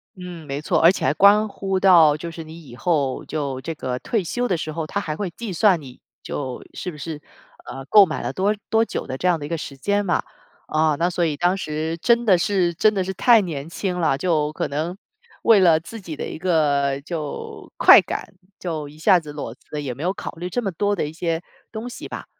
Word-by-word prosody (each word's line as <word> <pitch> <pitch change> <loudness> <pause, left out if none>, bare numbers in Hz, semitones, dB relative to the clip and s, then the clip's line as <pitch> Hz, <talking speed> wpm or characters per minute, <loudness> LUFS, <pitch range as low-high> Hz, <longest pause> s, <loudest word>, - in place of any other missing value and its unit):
嗯， 180 -4 -9
没 140 +1 -4
错。 - - +1
而 165 - +7
且 - - -3
还 130 - +3
关 200 +6 +5
乎 195 -2 -2
到 170 -6 +6
就 170 +2 -6
是 165 0 -8
你 160 +1 -12
以 120 -3 -12
后 140 -2 0
就 140 -4 -3
这 165 +4 -5
个 125 -4 -4
退 220 - -1
休 245 +8 -2
的 180 - 0
时 155 -1 -4
候， 155 0 -4
它 200 - -2
还 155 -5 -4
会 195 +2 -3
计 220 0 -6
算 185 0 +4
你 130 -2 -12 0.2
就 130 -3 -5
是 185 - -5
不 150 - -12
是， 150 +1 -6 0.5
呃， 135 0 -7
购 200 +7 +7
买 160 - -4
了 - - -3
多 200 +3 +1
多 225 0 +3
久 - - -4
的 130 - -5
这 180 - -1
样 175 -2 +2
的 145 - -6
一 - - -7
个 165 - -1
时 140 -3 -8
间 205 +8 0
嘛。 175 - +1 0.4
啊 155 -1 +2
那 175 +1 +2
所 175 -1 0
以 150 -3 -1
当 175 +3 +2
时 160 -2 -3
真 235 +2 +3
的 190 -5 +5
是 185 -3 +1
真 215 +6 +3
的 195 - 0
是 190 +1 -4
太 230 +4 +5
年 160 -5 -5
轻 180 +1 -3
了， 160 -5 +2
就 155 -3 0
可 - - -2
能 160 +6 -3 0.5
为 225 -3 +6
了 170 -4 +5
自 215 +7 -10
己 165 -5 -7
的 - - -5
一 - - -6
个 145 -5 +1
就 155 -3 -6
快 - - +9
感 - - -6 0.3
就 155 -5 -4
一 150 - -15
下 160 +4 +5
子 150 -3 -10
裸 145 -6 -6
辞 150 +3 -8
也 130 -3 -4
没 140 - -8
有 180 - +1
考 - - -6
虑 175 +2 -6
这 245 - -1
么 200 -4 -2
多 205 +4 0
的 175 - -1
一 150 - -8
些 165 0 -2 0.3
东 220 +3 -6
西 - - -8
吧。 - - -7
165 Hz, 260 characters per minute, -22 LUFS, 150-190 Hz, 0.5 s, 快